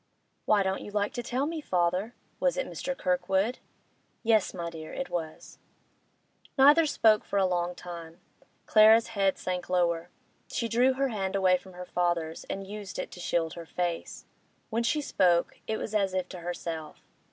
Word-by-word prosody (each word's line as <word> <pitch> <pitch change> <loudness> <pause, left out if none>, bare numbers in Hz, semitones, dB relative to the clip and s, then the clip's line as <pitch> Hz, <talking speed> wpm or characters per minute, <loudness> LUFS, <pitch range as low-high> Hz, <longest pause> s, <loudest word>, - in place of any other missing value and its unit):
'Why 205 -2 +4
don't 190 0 -1
you - - -8
like 205 0 -1
to 240 - -3
tell 255 +3 -1
me, 320 +1 -3
father? 180 +1 0 0.2
Was - - +1
it - - 0
Mr. 270 0 -4
Kirkwood?' 190 +5 0 0.6
'Yes, 220 -3 +3
my 170 -2 -5
dear, 160 -1 -8
it 270 - -5
was.' 160 -2 -5 1.0
Neither 295 +4 +7
spoke 220 -6 +4
for 200 - -3
a 195 - +4
long 175 -1 0
time. 170 -2 -9 0.5
Clara's 220 +1 +6
head 195 -4 +1
sank 180 -1 -4
lower; 175 -1 +1 0.4
she 230 - -2
drew 245 +3 +3
her 270 +1 0
hand 195 -4 -2
away 185 -2 +4
from 185 +1 -8
her 180 0 -8
father's, 175 -3 -1
and 195 0 -5
used 205 0 -7
it 185 - -4
to - - -10
shield 170 -2 -1
her 170 -1 -9
face. 175 -1 -3 0.5
When 230 +1 +1
she 265 +6 +1
spoke, 175 -10 +2
it 220 - -1
was 215 - -5
as 195 -3 +1
if 185 -1 -1
to 180 - -8
herself. 170 -2 -6
190 Hz, 175 wpm, -28 LUFS, 175-225 Hz, 1.0 s, Neither